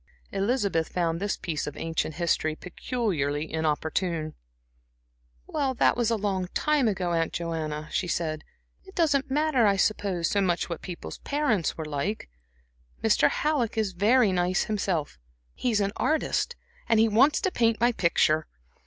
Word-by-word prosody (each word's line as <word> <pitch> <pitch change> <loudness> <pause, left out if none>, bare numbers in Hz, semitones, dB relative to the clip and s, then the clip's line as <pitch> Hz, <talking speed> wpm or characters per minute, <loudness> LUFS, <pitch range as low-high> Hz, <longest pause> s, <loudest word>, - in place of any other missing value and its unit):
Elizabeth 200 -6 0
found 165 -2 -1
this 200 +1 -1
piece 155 -5 -3
of 145 - -6
ancient 160 -1 -2
history 160 -2 0
peculiarly 160 - -2
inopportune. 160 +1 -1 1.1
"Well, 270 -3 -1
that - - +3
was 235 -2 +1
a 230 - +2
long 195 -3 -1
time 300 -5 +2
ago, 190 -4 -1
Aunt 165 -1 +1
Joanna," 155 -3 -3
she 180 - -1
said. 160 -2 -2 0.4
"It 380 0 -15
doesn't 290 -4 +2
matter, 280 -5 +3
I 200 - +3
suppose, 195 -4 0
so 200 - +1
much 180 -2 0
what 170 - -4
people's 180 -2 -7
parents 280 - 0
were 160 - -4
like. 150 - -3 0.7
Mr. - - +4
Halleck 280 -8 0
is 210 -4 0
very 215 +4 +4
nice 180 0 +1
himself. 180 - -2 0.3
He - - -1
is 215 -3 +2
an 200 0 0
artist, 315 +9 0 0.3
and 225 - +4
he 225 - +5
wants 245 +8 +4
to 380 - 0
paint 230 -5 +2
my 240 +2 +4
picture." 160 -6 +2
195 Hz, 155 wpm, -27 LUFS, 165-235 Hz, 1.1 s, he